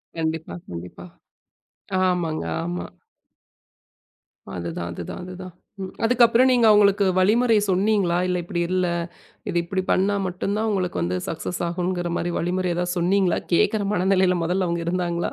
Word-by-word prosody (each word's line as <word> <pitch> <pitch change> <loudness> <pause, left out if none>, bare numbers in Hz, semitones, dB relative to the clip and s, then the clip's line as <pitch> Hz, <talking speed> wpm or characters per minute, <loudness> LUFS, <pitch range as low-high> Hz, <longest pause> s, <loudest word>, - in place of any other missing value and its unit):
கண்டிப்பா, 160 0 -3
கண்டிப்பா. 90 0 -8 1.0
ஆமாங்க, 175 -4 0 0.2
ஆமா. 175 +1 -4 1.7
அதுதான் 85 0 -4
அதுதான் 85 - -7
அதுதான். 185 0 -9 0.5
அதுக்கப்பறம் 240 +1 +5
ம் - - +4
நீங்க 240 -2 +4
அவங்களுக்கு 205 -1 +5 0.2
வழிமுறை 225 +4 +4
சொன்னீங்களா, 190 -2 +2
இல்ல 180 0 0
இப்படி 175 0 -3
இல்ல 185 -1 +1 0.6
இத - - -4
இப்டி 185 +2 -2
பண்ணா 200 +2 +2
மட்டும்தான் 200 +4 -2
உங்களுக்கு 180 - -1
வந்து 90 +2 -1
சக்சஸ் 165 +2 -4
ஆகும்ங்குற 175 0 -2
மாரி 175 - -2
வழிமுறை 180 +1 -1
ஏதாவது 175 0 -1
சொன்னீங்களா, 185 0 +2 0.2
கேட்கிற 210 +4 +2
மனநிலையில 185 -1 +3
முதல்ல 180 +2 0
அவங்க 170 0 -1
இருந்தாங்களா? 175 -1 -1
180 Hz, 130 wpm, -23 LUFS, 170-195 Hz, 1.7 s, அதுக்கப்பறம்